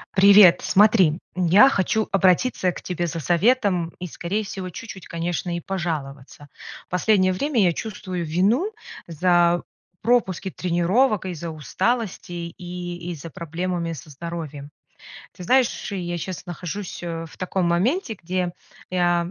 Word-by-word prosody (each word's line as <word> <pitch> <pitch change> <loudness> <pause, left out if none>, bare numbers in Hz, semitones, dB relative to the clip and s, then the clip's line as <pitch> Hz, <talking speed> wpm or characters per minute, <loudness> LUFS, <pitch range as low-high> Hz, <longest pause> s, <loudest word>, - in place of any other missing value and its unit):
Привет. 200 -2 +8
Смотри, 190 -6 +4 0.2
я 185 +8 +6
хочу 220 -1 0
обратиться 190 +1 +2
к - - -9
тебе 175 -1 -3
за 165 +1 -4
советом 180 - +2
и, 180 - -5
скорее 185 +6 -3
всего, 190 -2 -6
чуть-чуть, 190 0 -9
конечно, 170 +1 -3
и - - -2
пожаловаться. 145 -6 -5 0.4
Последнее 185 +1 +3
время 245 +6 0
я 175 -3 +3
чувствую 185 -4 -5
вину 200 - +1 0.4
за 175 +1 +3 0.4
пропуски 205 -6 +1
тренировок, 185 +6 +1
из-за 170 -2 -5
усталости, 175 - -3
и 175 -1 -6
из-за 165 0 -7
проблемами 170 +2 -3
со 155 0 -10
здоровьем. 150 -2 -7 0.7
Ты - - -10
знаешь, 255 +6 +1
я 175 -3 -3
щас 185 +2 -6
нахожусь, 180 +3 -6
э, 165 -1 -4
в - - -15
таком 185 0 -1
моменте, 225 - +1
где 180 0 -2 0.4
я, 175 -1 +2
180 Hz, 130 wpm, -23 LUFS, 170-195 Hz, 0.7 s, Привет